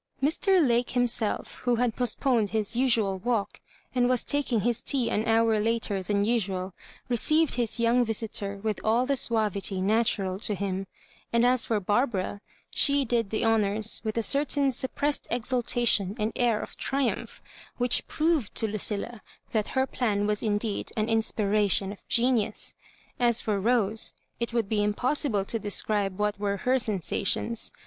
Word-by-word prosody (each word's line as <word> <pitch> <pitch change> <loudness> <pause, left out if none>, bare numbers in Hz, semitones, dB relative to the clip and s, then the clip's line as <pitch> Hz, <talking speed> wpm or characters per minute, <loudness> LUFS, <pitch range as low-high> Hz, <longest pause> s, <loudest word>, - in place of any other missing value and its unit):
Mr. 330 - +2
Lake 240 0 +2
hifnself, 245 -3 -1
who 245 -1 +1
had 235 -1 0
postponed 245 -3 +1
his 220 +1 -1
usual 230 -7 +1
walk, 225 0 -2 0.3
and 245 -1 +2
was 255 -2 +1
taking 280 -6 0
his 240 +2 -1
tea 260 -4 0
lui 215 - -1
hour 225 -1 +3
later 220 -2 0
than 200 +2 0
usual, 195 -5 -1 0.3
received 305 +6 +2
his 240 -3 -1
3''Oung 235 +2 +3
visitor 215 -3 -3
with 215 -1 -2
all 230 +3 +2
the 280 +1 0
suavity 210 -6 +1
natural 195 -2 +1
to 210 -1 +1
him; 195 0 -3 0.4
and 235 +1 +3
as 250 -1 +3
for 220 -2 0
Barbara, 205 -1 -1 0.3
she 280 -1 +4
did 230 -3 0
the 220 +2 -1
honours 220 -1 +3
with 220 0 -3
a 230 - +1
certain 280 +1 +2
suppressed 280 +3 -2
exultation 240 -4 +1
and 215 0 -1
air 235 -3 +1
of - - -8
triumph, 270 -2 -2 0.4
which 245 -1 +2
proved 310 -7 0
to 225 - +2
LuciUa 215 +2 -3 0.3
that 215 -2 0
her 260 - +3
plan 215 -6 -1
was 210 0 0
indeed 210 -1 -2
an 215 +1 0
inspiration 210 -3 +2
of 205 - -11
genius. 235 -3 +1 0.5
As 240 -1 +3
for 210 -2 -1
Rose, 220 0 +1 0.2
it 235 0 -2
would 230 -3 0
be 210 0 0
impossible 215 0 0
to 230 - -2
describe 205 -2 -1
what 210 -1 -1
were 200 -1 -1
her 255 +6 +1
sensations. 215 +1 -1
225 Hz, 155 wpm, -27 LUFS, 205-245 Hz, 0.5 s, she